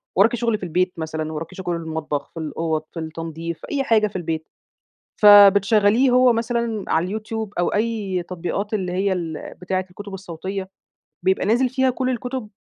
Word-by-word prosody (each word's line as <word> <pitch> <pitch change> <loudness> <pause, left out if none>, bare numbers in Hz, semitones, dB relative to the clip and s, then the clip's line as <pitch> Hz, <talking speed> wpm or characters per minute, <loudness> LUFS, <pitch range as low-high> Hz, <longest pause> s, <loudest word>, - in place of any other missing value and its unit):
وراكِ 215 +5 +4
شغل 235 -2 0
في - - -12
البيت، 180 +1 0
مثلًا 155 -1 -4
وراكِ 160 +4 -6
شغل 180 -2 -3
المطبَخ، 160 -3 -4
في 165 - -7
الأوض، 160 0 -2
في 170 - -5
التنضيف، 165 +1 -5
في - - -10
أي 280 -2 0
حاجة 220 -4 +3
في 205 - -14
البيت. 160 -3 -3 0.7
فبتشغِّلِيه 205 +3 +7
هو 250 0 +5
مثلًا 230 -2 -1
على 165 +3 +1
الYouTube 220 0 -5
أو 175 - +2
أي 210 -4 -1
تطبيقات 185 +4 -4
اللي 185 -4 -1
هي 190 +2 +1
ال 165 -4 -5
بتاعة 185 +1 -1
الكُتب 200 +2 -10
الصوتية، 190 +1 -6 0.6
بيبقى 190 0 +2
نازِل 240 +5 +3
فيها 260 +1 +2
كل 255 +1 -1
الكُتب 250 -1 -4
190 Hz, 170 wpm, -22 LUFS, 165-220 Hz, 0.7 s, فبتشغِّلِيه